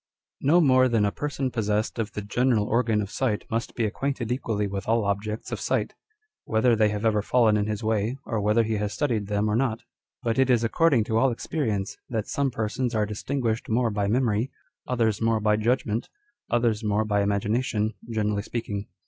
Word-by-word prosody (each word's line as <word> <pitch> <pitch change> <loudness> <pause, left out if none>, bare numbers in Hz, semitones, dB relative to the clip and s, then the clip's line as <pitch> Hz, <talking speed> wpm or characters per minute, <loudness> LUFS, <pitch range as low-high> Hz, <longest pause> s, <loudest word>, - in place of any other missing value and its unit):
l - - -2
No 175 - +6
more 130 -3 +5
than 115 -3 +2
a 100 - +1
person 140 -1 -3
possessed 110 0 -1
of 110 -1 -2
the 105 - -4
general 115 0 +1
organ 110 -2 +1
of 100 - -8
sight 115 -6 -1
must 115 +1 -2
be 115 - 0
acquainted 125 +2 -2
equally 110 -5 -1
with 100 -1 -4
all 115 -1 +2
objects 105 +2 -3
of - - -3
sight, - - -1 0.5
whether 115 +2 +2
they 110 -1 +3
have 105 +1 -3
ever 105 -2 +3
fallen 110 0 +3
in 105 0 +1
his 105 +1 -3
way, 110 +3 0
or 110 -3 -2
whether 105 +3 +3
he 110 -1 -1
has 105 0 -2
studied 115 -9 -1
them 105 +1 0
or 105 - +1
not. 115 -2 0 0.4
But 115 +2 0
it 130 -1 +3
is 120 -2 +3
according 135 +1 +3
to 110 +1 0
all 135 - +4
experience, 115 -5 -2
that 110 -3 -2
some 140 -1 0
persons 120 +1 -2
are 105 -1 +2
distinguished 115 +2 -2
more 115 +1 +2
by 105 -1 -1
memory, 115 +1 +1 0.4
others 115 -4 +1
more 115 -1 +2
by 105 0 +2
judgment, 115 0 0 0.4
others 115 -2 +1
more 105 +1 +1
by 105 -1 +1
ima 100 0 +1
gination, 110 0 -1 0.2
generally 105 -2 0
speaking. 105 -2 -4
110 Hz, 200 wpm, -26 LUFS, 105-120 Hz, 0.5 s, No